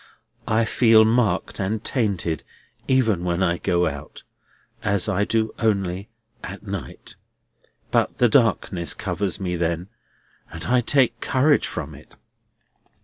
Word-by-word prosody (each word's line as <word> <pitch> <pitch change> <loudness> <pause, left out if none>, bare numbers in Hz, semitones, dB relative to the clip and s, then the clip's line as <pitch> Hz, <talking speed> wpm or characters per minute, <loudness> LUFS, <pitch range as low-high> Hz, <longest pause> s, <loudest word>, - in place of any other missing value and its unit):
I 115 0 +2
feel 110 -1 +5
marked 115 -1 +1
and 105 +3 -2
tainted, 95 - -1 0.4
even 115 -9 +2
when 90 +1 0
I 85 -1 +1
go 90 0 +1
out—as 105 -1 -5
I 105 0 +1
do 110 0 0
only—at 100 -4 -3
night. - - -7 0.7
But - - +1
the 125 - +4
darkness 110 -7 +1
covers 95 -4 -2
me 90 -2 -2
then, 85 +2 -2 0.6
and 80 +1 -7
I 125 0 +3
take 120 -2 +2
courage 140 +3 +2
from - - -6
it." - - -15
105 Hz, 120 wpm, -23 LUFS, 90-115 Hz, 0.7 s, feel